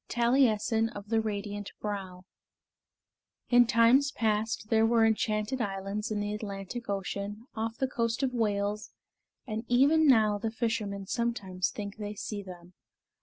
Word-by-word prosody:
II - - -8
TALIESSIN 235 -2 +3
OF 205 0 -8
THE 225 -1 +2
RADIANT 205 -1 -4
BROW 190 -3 -5 1.3
In 245 -1 +6
times 245 +4 +4
past 220 -2 -1
there 220 0 +4
were 225 0 +4
enchanted 220 +2 0
islands 200 +1 -3
in 215 -1 -2
the 205 0 -2
Atlantic 210 +2 -6
Ocean, 200 +2 -4
off 225 0 -3
the 265 - 0
coast 230 0 -1
of 255 -1 0
Wales, 210 -2 -1 0.6
and 220 -2 -4
even 285 +6 +4
now 215 -5 +4
the 225 - -2
fishermen 220 -4 -2
sometimes 195 -5 -1
think 205 -1 -7
they 210 -1 -5
see 205 0 -5
them. 180 -2 -12
215 Hz, 145 wpm, -29 LUFS, 205-235 Hz, 1.3 s, In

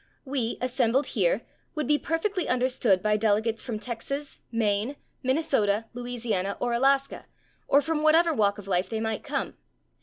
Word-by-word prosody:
We, 260 -4 -1
assembled 255 +1 +1
here, - - +1 0.3
would 305 -2 -1
be 295 +3 +3
perfectly 360 +3 -1
understood 250 -6 +2
by 210 0 +3
delegates 220 +1 +1
from 235 -4 -3
Texas, 255 +6 -5
Maine, 220 +3 0 0.3
Minnesota, 260 -7 +1
Louisiana, 235 -5 -2
or 245 -1 0
Alaska, 270 +3 +1 0.4
or 285 - +5
from 310 +1 -1
whatever 325 +2 +5
walk 205 -5 +2
of 205 -2 -10
life 185 -1 0
they 220 - -2
might 220 -1 -2
come. 285 -2 -3
245 Hz, 150 wpm, -27 LUFS, 220-280 Hz, 0.4 s, or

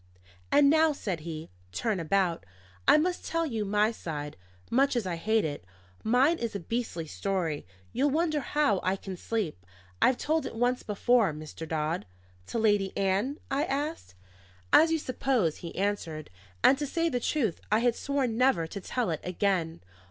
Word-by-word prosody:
"And 290 -1 +6
now," 315 +1 +5
said 190 - -3
he, 160 0 -7 0.2
"turn 210 - -1
about: 170 - +1 0.4
I - - +8
must 355 +3 0
tell 330 0 -1
you 225 -8 -2
my 210 +2 +2
side, 150 -8 -6 0.4
much 270 +3 +3
as 235 -4 0
I 180 -2 -2
hate 220 +5 +1
it. 145 - -4 0.4
Mine 265 +9 +3
is 230 -3 -3
a - - -1
beastly 225 -3 -3
story. 165 - -2 0.3
You'll 275 +4 +2
wonder 310 +1 +1
how 285 -8 +1
I 185 +1 +1
can 190 -1 -7
sleep. 180 - -3 0.4
I've 255 - +4
told 315 +1 0
it - - -8
once 245 +2 +1
before, 215 -2 +2
Mr. 155 +1 -8
Dodd." 155 - -2 0.4
"To - - -3
Lady 205 -3 +2
Ann?" 200 +9 +1
I 275 +2 +1
asked. 285 - -3 0.6
"As 325 +1 +7
you 325 - +3
suppose," 255 - 0
he 170 - -8
answered; 180 - -2 0.3
"and 270 - +6
to 295 - -2
say 330 +4 0
the 250 -6 0
truth, 235 - -1
I 215 - +5
had 240 -1 +2
sworn 275 -5 -1
never 240 -9 +3
to 200 +5 -7
tell 235 -2 -1
it 160 - -3
again. 180 -3 -1
215 Hz, 175 wpm, -29 LUFS, 170-270 Hz, 0.6 s, I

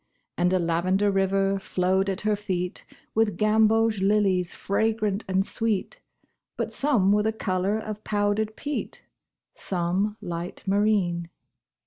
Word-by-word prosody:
And 180 +1 +2
a 185 - +3
lavender 185 +4 +1
river 195 0 +1
flowed 190 +1 0
at 190 0 -3
her 215 0 +1
feet 185 -3 -4 0.3
With 220 -2 +1
gamboge 220 0 +3
lilies 195 -3 +2
fragrant 215 0 -1
and 190 0 +1
sweet, 225 - -2 0.6
But - - -3
some 245 -10 +2
were 210 +1 +4
the 220 +1 +1
color 195 -1 -1
of 215 -1 -6
powdered 210 +1 0
peat, 295 0 -5 0.5
Some 190 +4 -1
light 170 +1 -6
marine. 195 -4 +1
200 Hz, 125 wpm, -26 LUFS, 185-215 Hz, 0.6 s, were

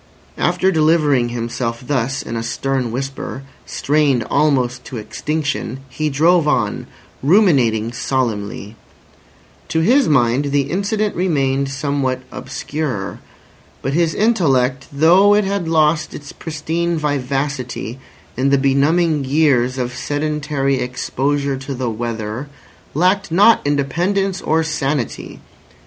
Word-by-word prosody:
After 180 +2 +2
delivering 155 -6 +3
himself 115 0 -3
thus 135 -1 -1
in 115 - -5
a 115 - -2
stern 125 +1 -2
whisper, 135 +1 -5 0.2
strained 145 -4 +1
almost 125 -4 +1
to 130 - -7
extinction, 140 +3 -3
he 155 +4 -2
drove 160 +3 +3
on, 150 - 0 0.3
ruminating 135 - +3
solemnly. 110 -5 -2 0.9
To 160 - 0
his 255 +10 +4
mind 130 -1 +3
the 140 -1 0
incident 205 +3 -1
remained 140 -6 0
somewhat 140 -2 -1
obscure. 130 -6 -4 0.6
But 135 - -1
his 165 0 +1
intellect, 135 - +2
though 175 +8 +5
it 210 - +3
had 195 -3 -2
lost 155 -1 +2
its 145 -1 -9
pristine 165 +2 -2
vivacity 135 -4 -2 0.4
in 130 +3 +1
the 140 - +4
benumbing 145 +3 +2
years 130 -3 +2
of 125 -1 -3
sedentary 145 -2 -1
exposure 135 +2 -1
to 135 +1 -6
the 125 -2 -2
weather, 115 +3 -4 0.5
lacked 185 +3 +2
not 205 +7 +5
independence 175 +8 0
or 160 +1 +1
sanity. 150 -5 -3
140 Hz, 115 wpm, -18 LUFS, 130-160 Hz, 0.9 s, though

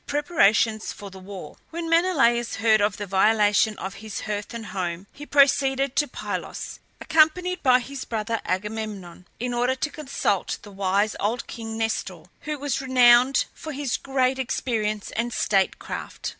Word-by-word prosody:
PREPARATIONS 225 - +2
FOR 200 -1 -10
THE 190 - -11
WAR. 190 0 -9
When 335 0 -5
Menelaus 280 -9 +2
heard 220 -1 +3
of 205 0 +1
the 205 - -4
violation 210 +2 +3
of 190 0 -5
his 220 -2 -6
hearth 205 -1 -4
and 230 -1 -6
home 180 -2 -4
he 295 +1 -10
proceeded 275 -1 +3
to 295 - +3
Pylos, - - -5 0.2
accompanied 355 +3 +2
by 255 -2 +5
his 270 +2 -7
brother 225 0 -3
Agamemnon, 195 -2 -4
in 245 +1 -2
order 245 +2 +1
to 290 +3 -3
consult 270 -10 -1
the 205 - -11
wise 200 +2 0
old 225 +4 -1
king 225 -1 -7
Nestor, 195 -6 -2 0.2
who 300 0 -4
was 280 -2 -2
renowned 255 0 +5
for 315 - -8
his 275 -2 -2
great 265 -1 0
experience 215 -5 -2
and 235 +2 -2
state 195 -3 +1
craft. - - -6
230 Hz, 155 wpm, -24 LUFS, 205-270 Hz, 0.2 s, by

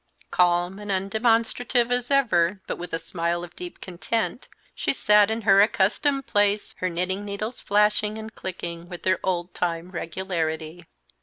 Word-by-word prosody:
Calm 175 +2 +2
and 210 0 -8
undemonstrative 230 +4 +1
as 245 0 0
ever, 205 -9 +3
but - - -4
with 175 - -6
a 165 - 0
smile 170 +1 -2
of 175 0 -10
deep 180 -1 -8
content, 220 +7 -3 0.3
she - - 0
sat 210 -4 +5
in 225 +1 -1
her 195 -1 +6
accustomed 245 +7 +2
place, 205 0 +1
her 185 - 0
knitting 185 +3 -2
needles 210 +4 -5
flashing 210 +1 +2
and 220 0 -8
clicking 170 -2 -6
with 175 -2 -8
their 185 0 +2
old 175 -1 -2
time 170 0 -2
regularity. 165 -2 -3
190 Hz, 155 wpm, -25 LUFS, 175-215 Hz, 0.3 s, her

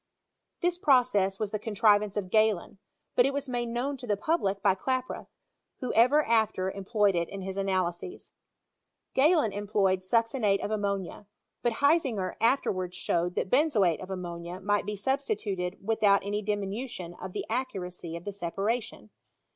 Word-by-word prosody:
This 350 0 +1
process 245 - +3
was 210 -1 -3
the 215 - -2
contrivance 210 -1 +2
of 185 -3 -3
Gehlen; 215 -3 +2 0.4
but 245 - +5
it 275 - -1
was 285 0 -2
made 240 -1 -2
known 255 +4 -2
to 250 -1 -9
the 205 -2 +1
public 200 - 0
by - - +5
Klaproth, 255 +6 -3 0.5
who 255 - -3
ever 255 +7 +5
after 220 -5 +1
employed 200 +1 +1
it 170 -1 0
in 195 - -6
his 190 0 -5
analyses. 190 - -2 0.8
Gehlen 300 - +4
employed 200 -2 +1
succinate 225 +1 +1
of 205 - -4
ammonia; 200 -2 -3 0.3
but 240 - +1
Hisinger 270 - +2
after 245 +5 +3
wards 180 -1 -4
showed 175 +1 0
that 185 - -2
benzoate 235 - +3
of 185 - -8
ammonia 175 -1 -6
might 205 +1 0
be 210 - -2
substituted 205 - -2
without 205 -3 +3
any 205 +1 -1
diminution 205 -2 -4
of 185 -1 -6
the - - -3
accuracy 180 -8 -4
of 170 - -7
the 205 - -5
separation. 205 +5 -3
205 Hz, 155 wpm, -28 LUFS, 190-245 Hz, 0.8 s, but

